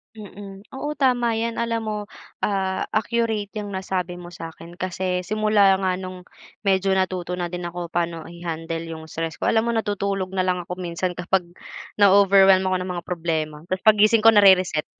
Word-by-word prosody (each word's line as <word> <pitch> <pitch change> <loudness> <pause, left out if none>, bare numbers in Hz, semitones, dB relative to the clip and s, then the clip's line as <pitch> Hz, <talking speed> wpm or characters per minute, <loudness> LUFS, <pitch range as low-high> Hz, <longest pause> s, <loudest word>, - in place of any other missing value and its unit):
Mm. 200 -2 -10
Oo, 295 +3 -4
tama 245 -4 +2
'yan. 230 +1 -2
Alam 230 -1 -1
mo, 215 -1 -3 0.4
ah, 190 -2 -1
accurate 220 -2 0
'yang 210 -1 -4
nasabi 185 -2 -3
mo 175 0 -10
sa'kin 165 +1 -10
kasi 185 0 -2
simula 210 -2 +3
nga 190 -1 -1
no'ng 185 -1 -8 0.4
medyo 195 -1 +2
natuto 185 -1 -1
na 175 -1 -4
din 175 -1 -4
ako 175 0 -6
paano 170 -1 -2
i-handle 165 -1 -5
yung 160 -1 -7
stress 165 0 -4
ko, - - -1
alam 225 +1 +2
mo - - +1
natutulog 200 -3 -2
na 185 -1 0
lang 180 -1 0
ako 180 +1 -7
minsan 180 +1 -2
kapag 180 +1 0 0.6
na-overwhelm 195 -1 +6
ako 185 0 +1
ng 180 0 -4
mga 175 - -6
problema 160 -3 -2
tapos 185 0 -3
paggising 215 +1 +5
ko 225 - +9
nare-reset. 190 -6 +5
190 Hz, 170 wpm, -23 LUFS, 175-205 Hz, 0.6 s, ko